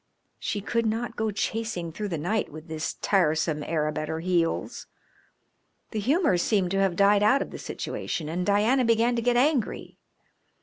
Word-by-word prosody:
She 205 - -3
could 230 +2 0
not 230 +1 -2
go 220 0 -1
chasing 210 -4 -3
through 210 +6 -4
the 170 -4 -3
night 200 +8 -1
with 155 +2 -10
this 160 -1 -4
tiresome 160 -5 +2
Arab 155 0 -1
at 155 - -4
her 160 - -2
heels. 170 -1 -1 1.0
The 220 - -2
humour 270 - +2
seemed 185 -1 +1
to 195 - +1
have 195 -3 +2
died 200 +2 +4
out 255 +7 +4
of - - -12
the - - -8
situation 155 - -4
and 170 +3 -2
Diana 215 +7 +3
began 230 +1 +3
to 235 - 0
get 240 +1 +2
angry. 270 -2 0
200 Hz, 175 wpm, -26 LUFS, 165-225 Hz, 1.0 s, died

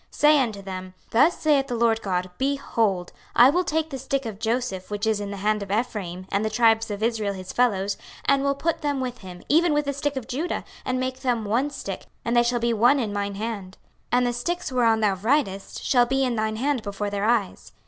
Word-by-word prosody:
26:037:019 - - -36
Say 300 0 +6
unto 220 -5 -2
them, 185 -1 -7 0.2
Thus 290 +10 +4
saith 290 -3 +3
the 245 - -2
Lord 225 -1 +2
GOD; 185 -2 -2
Behold, 230 -9 0 0.2
I 250 +3 +8
will 360 +4 +2
take 320 -1 -1
the 270 - -4
stick 270 +1 -2
of 215 -3 -6
Joseph, 225 -5 -2
which 205 0 -2
is 220 -2 +1
in 205 -1 -4
the 200 - -5
hand 210 +2 0
of 200 - -6
Ephraim, 200 -5 -2
and 200 +2 +1
the 220 - 0
tribes 225 0 +3
of 205 +1 -4
Israel 220 -3 0
his 185 -1 -8
fellows, 205 -5 +1 0.3
and 275 -1 +3
will 280 0 +1
put 330 +3 -1
them 285 -2 -1
with 250 -1 -4
him, 180 -2 -10
even 325 +2 +4
with 295 0 +1
the 280 - -1
stick 285 +1 -2
of 260 -4 -5
Judah, 305 +8 -2 0.2
and 255 0 0
make 255 0 -3
them 240 -4 0
one 240 +8 +1
stick, - - -6 0.2
and 235 - 0
they 240 - +6
shall 240 0 +1
be 235 0 +1
one 240 +6 +4
in 215 -5 -2
mine 200 -1 -2
hand. 205 -3 -5 0.3
26:037:020 245 - +4
And 250 - +3
the 245 - 0
sticks 345 +7 -3
whereon 230 -3 +3
thou 205 -2 +3
writest 200 -1 -1
shall 245 -2 +4
be 270 +2 +1
in 250 -2 0
thine 220 0 -1
hand 265 +2 0
before 205 0 -4
their 200 0 -1
eyes. 225 -4 0
230 Hz, 240 wpm, -24 LUFS, 205-265 Hz, 0.3 s, I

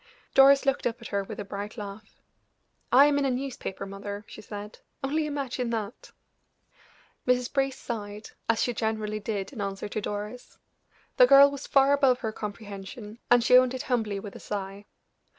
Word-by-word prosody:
Doris 275 +1 +7
looked 275 -2 +1
up 240 +1 -4
at 235 - -9
her 200 -1 -1
with 195 - -8
a 205 - -4
bright 205 +3 -6
laugh. 205 0 -9 0.7
"I 270 +3 +8
am 290 -1 +3
in 280 - +1
a - - +2
newspaper, 250 -7 -4
mother," 200 +1 -7
she - - -10
said, 210 0 -8 0.2
"only 300 +3 0
imagine 265 -4 -3
that!" 225 -1 -5 1.2
Mrs. 250 -1 +1
Brace 270 -1 0
sighed, 210 -2 -6 0.2
as 230 - +3
she 245 - 0
generally 215 -1 -2
did 205 +1 -4
in 225 - -6
answer 195 0 -4
to 215 - -3
Doris. 210 +4 -6 0.6
The - - +8
girl 280 - +8
was 280 0 -7
far 275 0 +5
above 270 -3 +3
her 220 - -2
comprehension, 210 +1 -8
and 245 -1 +5
she 250 +2 +5
owned 255 0 +5
it 255 - -4
humbly 220 -5 -1
with 200 0 -9
a - - -8
sigh. 200 0 -6
225 Hz, 180 wpm, -27 LUFS, 205-265 Hz, 1.2 s, I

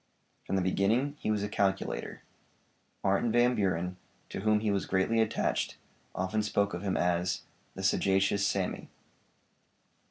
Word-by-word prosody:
From - - 0
the 95 - +1
beginning 110 +10 +1
he - - -2
was 105 -1 +1
a - - -1
calculator. 100 -2 -1 0.8
Martin 100 +4 +2
Van 120 +2 +4
Buren, 90 -4 -1 0.3
to - - -5
whom 105 +1 +2
he 110 -1 +1
was 100 -1 -1
greatly 95 +4 +2
attached, 110 - 0 0.4
often 95 +4 0
spoke 100 -2 0
of 85 - -4
him 100 -2 -1
as 90 +1 0 0.3
'The 95 - -6
sagacious 100 +1 +2
Sammy.' - - -2
100 Hz, 145 wpm, -30 LUFS, 95-110 Hz, 0.8 s, Van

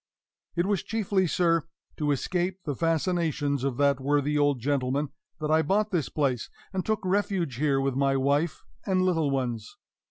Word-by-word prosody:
It 175 +1 +1
was 200 -2 +1
chiefly, 200 -4 0
sir, 165 0 +2 0.4
to 150 -1 0
escape 180 +6 -1
the 145 - -1
fascinations 160 -3 0
of 135 -3 -1
that 140 -1 +3
worthy 145 +1 +1
old 145 -2 +2
gentleman 140 +2 0 0.3
that 155 0 -1
I 160 0 +5
bought 205 +7 +1
this 170 -7 0
place, 135 -6 -1 0.2
and 190 -1 -1
took 215 -1 -1
refuge 185 - 0
here 140 -1 +2
with 135 0 0
my 135 +1 +2
wife 145 +4 +1 0.2
and 185 -2 +1
little 165 -5 +2
ones. 120 -5 -2
150 Hz, 165 wpm, -27 LUFS, 140-180 Hz, 0.4 s, I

